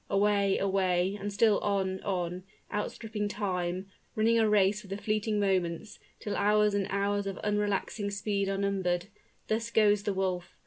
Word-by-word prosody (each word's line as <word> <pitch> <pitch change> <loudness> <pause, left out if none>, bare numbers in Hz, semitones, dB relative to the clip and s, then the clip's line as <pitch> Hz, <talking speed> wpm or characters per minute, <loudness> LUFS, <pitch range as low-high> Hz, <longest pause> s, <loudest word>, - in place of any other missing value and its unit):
Away, 200 -1 +2
away, 190 -1 +1
and 205 +1 -3
still 210 +1 +3
on, 190 -2 -1
on 180 -2 -2 0.3
outstripping 210 0 -3
time 185 -2 -3 0.2
running 230 +1 +3
a 220 -1 +3
race 205 0 +3
with 200 - -14
the 195 - -3
fleeting 215 0 -1
moments, 190 -1 -1 0.2
till 205 - -4
hours 210 0 +3
and 200 -1 0
hours 200 0 0
of 195 - -4
unrelaxing 205 0 -1
speed 200 -1 -1
are 195 - -1
numbered 195 -2 -1 0.4
thus 230 +1 -1
goes 210 -3 +4
the 205 -1 -1
wolf. 180 -2 -2
200 Hz, 160 wpm, -30 LUFS, 190-210 Hz, 0.4 s, goes